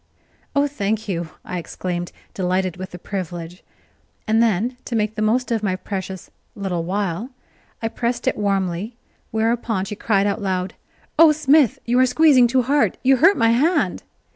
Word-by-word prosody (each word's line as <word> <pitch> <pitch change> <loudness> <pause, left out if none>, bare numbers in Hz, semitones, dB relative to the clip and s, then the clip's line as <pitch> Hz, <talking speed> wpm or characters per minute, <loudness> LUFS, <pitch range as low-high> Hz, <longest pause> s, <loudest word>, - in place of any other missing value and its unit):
"Oh, 285 0 +4
thank 220 -5 -2
you," 170 -4 -3 0.2
I 180 - -4
exclaimed, 175 +1 -4 0.2
delighted 185 -1 -1
with 185 +1 -7
the 180 - -9
privilege; 175 -2 -6 0.7
and 220 +1 +3
then, 230 +3 +1
to 240 - -3
make 215 -1 0
the 215 - -4
most 240 +4 +1
of 225 -2 +1
my 195 -3 0
precious 190 -1 -6 0.2
"little 190 -5 -2
while," 195 +4 -2 0.5
I - - +2
pressed 235 +1 -2
it - - +2
warmly, 195 +1 -1 0.3
whereupon 225 -2 0
she 210 - -5
cried 200 -2 +1
out 205 +2 0
aloud: 185 -2 -2 0.5
"Oh, 325 -1 +9
Smith, 295 -4 +3
you 245 +1 +2
are 255 - +5
squeezing 265 -2 +5
too 255 +1 +2
hard 280 +3 +2
you 265 +1 +5
hurt 355 +9 +5
my 230 -1 +4
hand!" 300 +10 +1
215 Hz, 165 wpm, -21 LUFS, 185-245 Hz, 0.7 s, Oh